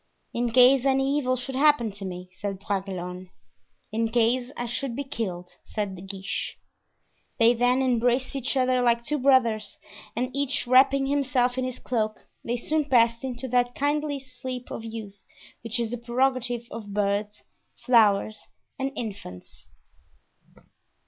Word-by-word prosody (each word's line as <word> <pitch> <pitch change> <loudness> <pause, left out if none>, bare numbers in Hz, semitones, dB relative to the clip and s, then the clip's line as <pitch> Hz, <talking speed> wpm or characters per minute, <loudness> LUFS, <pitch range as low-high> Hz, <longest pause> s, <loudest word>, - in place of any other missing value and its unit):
"In 240 0 0
case 255 +2 +6
any 270 +1 +2
evil 255 -2 0
should 255 +2 -5
happen 275 -5 +3
to 200 0 -7
me," 180 0 -7
said 195 0 -4
Bragelonne. 185 -2 -4 0.6
"In 225 +1 0
case 245 +2 +1
I 240 - -2
should 240 +1 -3
be 280 - -2
killed," 185 -9 -5
said 205 -3 -4
De 180 - -10
Guiche. 195 0 -5 0.8
They 230 0 +5
then 245 +2 +2
embraced 250 +1 +1
each 270 +1 -1
other 255 -1 +2
like 235 -1 +2
two 300 +4 -1
brothers, 255 -5 +2 0.4
and 255 +3 -2
each 280 -2 0
wrapping 270 +2 +5
himself 260 -3 +1
in 260 0 -1
his 255 -1 -4
cloak 215 -3 -2 0.2
they 240 +1 -1
soon 305 +5 0
passed 235 -3 +3
into 260 0 -4
that 245 0 +1
kindly 290 0 0
sleep 255 -1 -7
of 225 - -5
youth 220 -3 -8 0.4
which 230 +1 -2
is 230 -1 -1
the 245 - -4
prerogative 245 0 0
of 210 -3 -7
birds, 205 +1 -1 0.4
flowers 215 -3 +3 0.3
and 270 0 -1
infants. 200 - -8
240 Hz, 150 wpm, -26 LUFS, 215-260 Hz, 0.8 s, case